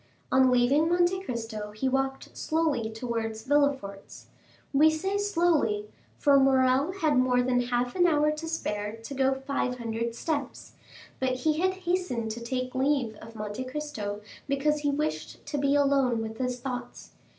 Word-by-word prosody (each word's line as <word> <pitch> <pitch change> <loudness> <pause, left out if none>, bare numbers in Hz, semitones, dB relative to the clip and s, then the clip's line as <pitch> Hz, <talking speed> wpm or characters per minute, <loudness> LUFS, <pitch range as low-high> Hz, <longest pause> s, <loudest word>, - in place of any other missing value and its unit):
On 260 0 +5
leaving 255 +6 +3
Monte 350 +2 +2
Cristo 225 - -5
he 215 +5 -1
walked 270 0 -2
slowly 310 -8 0
towards 225 -1 -4
Villefort's; 275 -8 -1 0.5
we 300 +3 +6
say 385 +6 -1
slowly, 325 - +1 0.3
for 280 -1 +5
Morrel 265 +3 +3
had 315 -8 +1
more 250 -1 +3
than 245 0 +2
half 245 0 -1
an 355 -1 +4
hour 300 -2 +3
to 305 +2 -5
spare 210 -10 -3
to 225 +4 -9
go 265 0 +2
five 265 -2 -2
hundred 230 0 -3
steps, 285 -1 -3 0.5
but 260 -1 +1
he 310 +1 +1
had 375 +1 +2
hastened 345 -11 -1
to 235 +2 -6
take 255 +1 -3
leave 265 -3 +1
of 225 +1 -12
Monte 210 +3 -4
Cristo 255 -8 -5 0.3
because 290 +2 +1
he 290 -1 0
wished 300 +2 -3
to 290 - -3
be 280 0 +2
alone 275 -5 +2
with 220 0 -7
his 250 -1 -2
thoughts. 250 0 -6
265 Hz, 160 wpm, -28 LUFS, 235-300 Hz, 0.5 s, we